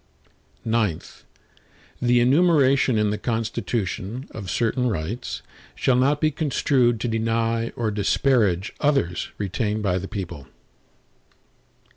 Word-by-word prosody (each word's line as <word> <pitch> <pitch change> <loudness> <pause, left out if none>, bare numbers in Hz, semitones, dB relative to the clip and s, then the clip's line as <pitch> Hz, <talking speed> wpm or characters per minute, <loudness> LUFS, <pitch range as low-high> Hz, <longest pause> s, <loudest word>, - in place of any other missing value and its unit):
IX 110 -7 -2 0.8
The 120 0 +4
enumeration 140 -3 +4
in 105 -1 +2
the 105 - -3
Constitution, 115 0 -3
of 100 -4 -7
certain 125 +2 0
rights, 105 +5 -4 0.3
shall 130 - +2
not 140 +4 +2
be 155 0 +2
construed 135 -5 +1
to 120 - -1
deny 115 0 0
or 115 -2 -1
disparage 105 -2 +1
others 135 - 0
retained 105 +2 -2
by 95 -2 +1
the 95 - -6
people. 85 -9 -6
115 Hz, 110 wpm, -23 LUFS, 100-130 Hz, 0.8 s, The